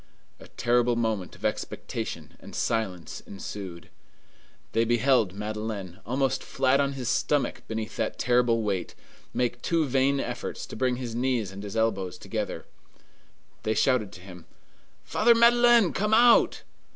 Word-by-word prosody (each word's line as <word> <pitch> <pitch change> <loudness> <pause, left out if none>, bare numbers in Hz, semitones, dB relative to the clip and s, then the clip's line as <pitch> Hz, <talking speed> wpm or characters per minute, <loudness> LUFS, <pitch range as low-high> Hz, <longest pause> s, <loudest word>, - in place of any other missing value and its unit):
A - - -13
terrible 120 0 +1
moment 110 -6 -2
of - - -9
expectation - - -4
and - - -11
silence 95 -8 -2
ensued. 95 -3 -8 0.8
They 115 - +2
beheld 120 -3 +2
Madeleine, 105 -3 -5
almost 130 +1 0
flat 130 +1 +2
on 140 0 +1
his 130 -3 -5
stomach 145 +3 0
beneath 110 -1 -5
that - - -2
terrible 120 -2 +2
weight, 100 -4 -2 0.4
make 120 -1 -1
two 165 -2 +1
vain 135 +1 +2
efforts 125 -1 -4
to - - -9
bring 130 -1 +1
his 120 -2 -5
knees 120 -4 0
and 95 +1 -8
his 105 +2 -6
elbows 100 -5 0
together. - - -4 1.0
They 110 - -1
shouted 125 -7 +2
to 90 - -11
him, 90 -3 -12 0.6
"Father 235 +2 +4
Madeleine, 235 -3 +5
come 210 +2 +2
out!" 240 +1 +5
120 Hz, 140 wpm, -27 LUFS, 105-135 Hz, 1.0 s, Madeleine